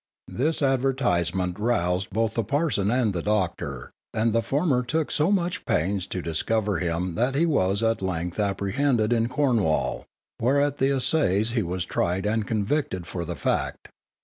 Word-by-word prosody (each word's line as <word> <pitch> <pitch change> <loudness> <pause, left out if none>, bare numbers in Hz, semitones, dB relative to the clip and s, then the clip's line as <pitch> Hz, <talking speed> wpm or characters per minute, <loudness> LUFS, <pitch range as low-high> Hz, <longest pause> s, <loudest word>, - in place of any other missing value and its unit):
This 155 +4 0
advertisement 105 -10 +1
roused 95 -5 0
both 110 +2 0
the 115 - 0
parson 125 -5 0
and 120 -3 +1
the 85 - -2
doctor, 85 -10 -2 0.2
and 110 0 +2
the 115 - +3
former 140 0 +1
took 155 +5 -1
so 155 +6 +2
much 180 -3 0
pains 95 +3 0
to 90 -2 -4
discover 100 +4 0
him 85 0 -1
that 125 +7 0
he 160 +4 +3
was 100 - +1
at 115 -2 +1
length 90 0 -3
apprehended 105 +4 +1
in 115 0 +1
Cornwall, 120 - +1 0.3
where 130 +5 +2
at 145 0 0
the 135 - +3
assizes 125 - +1
he 115 -1 +1
was 90 0 -3
tried 90 +2 -1
and 110 0 0
convicted 105 - -1
for 85 -1 -4
the 85 +1 -4
fact. - - -2
110 Hz, 165 wpm, -25 LUFS, 95-135 Hz, 0.3 s, the